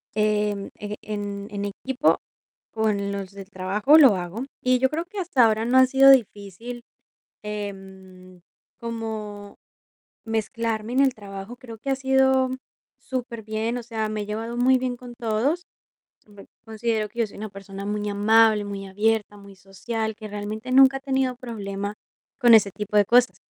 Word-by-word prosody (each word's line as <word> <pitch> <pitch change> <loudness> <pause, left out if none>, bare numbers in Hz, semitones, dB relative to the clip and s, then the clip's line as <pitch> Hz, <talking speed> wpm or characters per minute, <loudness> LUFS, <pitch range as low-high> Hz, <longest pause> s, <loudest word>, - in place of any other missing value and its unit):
em, 210 -1 0
e 210 0 -5
en 205 -1 -5
en 205 -1 -3
equipo, 260 +8 0 0.5
con 210 -3 0
los 200 -1 -5
del 195 0 -11
trabajo 200 +10 +3
lo 270 -9 +7
hago, 185 +8 -5 0.2
y 255 0 +2
yo 265 +1 +3
creo 325 +3 -3
que 395 +3 -8
hasta 335 -10 +3
ahora 220 0 +1
no 250 +2 +3
ha 260 - +8
sido 270 +1 +6
difícil, 230 0 0 0.6
em, 190 -3 -8 0.4
como 220 -3 -6 0.7
mezclarme 225 0 -2
en 265 - +2
el 275 -1 +4
trabajo, 200 +2 -9
creo 235 -4 -11
que 275 - -4
ha 270 - +1
sido 265 -1 +3 0.5
superbien, 230 -2 -4
o - - -6
sea, 225 -2 -3
me 215 0 -3
he - - -7
llevado 225 +3 -4
muy 255 +1 +4
bien 250 -1 -2
con 245 0 -11
todos. 240 +10 0 0.7
Bueno, 205 -1 -15 0.2
considero 220 -1 -1
que 235 +3 -10
yo 230 - +2
soy - - -14
una 215 +1 -6
persona 195 0 -9
muy 210 0 -2
amable, 215 +1 +4
muy 200 -1 -6
abierta, 210 +1 0
muy 200 -1 -14
social, 220 +4 -4
que 215 0 -9
realmente 210 +4 -6
nunca 270 +1 +6
ha - - -8
tenido 265 -2 0
problema 205 -5 -5 0.5
con 240 -3 +6
ese 205 -2 +4
tipo 210 +2 -2
de 205 - +5
cosas, 245 +3 +4
220 Hz, 165 wpm, -24 LUFS, 205-245 Hz, 0.7 s, ha